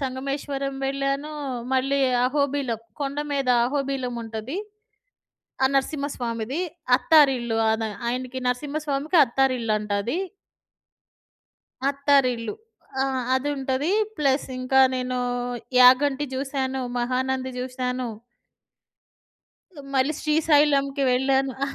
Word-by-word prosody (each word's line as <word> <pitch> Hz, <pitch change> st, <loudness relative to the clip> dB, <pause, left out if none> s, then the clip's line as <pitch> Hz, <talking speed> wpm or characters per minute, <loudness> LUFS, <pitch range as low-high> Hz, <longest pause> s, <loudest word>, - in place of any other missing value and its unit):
సంగమేశ్వరం 275 Hz, +1 st, -3 dB
వెళ్ళానూ. 275 Hz, +2 st, -2 dB, 0.4 s
మళ్ళీ 270 Hz, +2 st, +1 dB, 0.2 s
అహోబిలం, 275 Hz, -3 st, 0 dB, 0.2 s
కొండ 280 Hz, 0 st, -2 dB, 0.2 s
మీద 275 Hz, -2 st, -1 dB, 0.2 s
అహోబిలం 270 Hz, -2 st, -2 dB
ఉంటది. 225 Hz, -, -5 dB, 1.1 s
ఆ! -, -, +6 dB
నరసింహస్వామిది 265 Hz, -3 st, -2 dB, 0.4 s
అత్తారిల్లు. 265 Hz, -8 st, +4 dB
ఆన 220 Hz, 0 st, 0 dB, 0.2 s
ఆయనకి 255 Hz, +1 st, -3 dB
నరసింహస్వామికి 290 Hz, +4 st, -1 dB
అత్తారిల్లు 255 Hz, -2 st, 0 dB
అంట 210 Hz, 0 st, -8 dB
అది. 240 Hz, -, -2 dB, 1.7 s
అత్తారిల్లు. 275 Hz, -, +1 dB, 0.5 s
ఆ! -, -, +2 dB, 0.3 s
అదుంటది 270 Hz, +2 st, -1 dB, 0.3 s
ప్లస్ 280 Hz, -3 st, +1 dB
ఇంకా 255 Hz, +1 st, +3 dB
నేనూ 255 Hz, 0 st, -2 dB, 0.6 s
యాగంటి 265 Hz, +3 st, +6 dB
జూశాను, 265 Hz, -1 st, -2 dB, 0.2 s
మహానంది 260 Hz, +1 st, -1 dB
జూశాను. 250 Hz, 0 st, -3 dB, 1.9 s
మళ్ళీ 270 Hz, +3 st, +2 dB
శ్రీశైలం‌కి 295 Hz, -3 st, +2 dB
వెళ్ళాను. 265 Hz, +1 st, +2 dB
అహా! -, -, -3 dB
265 Hz, 85 wpm, -24 LUFS, 255-280 Hz, 1.9 s, ఆ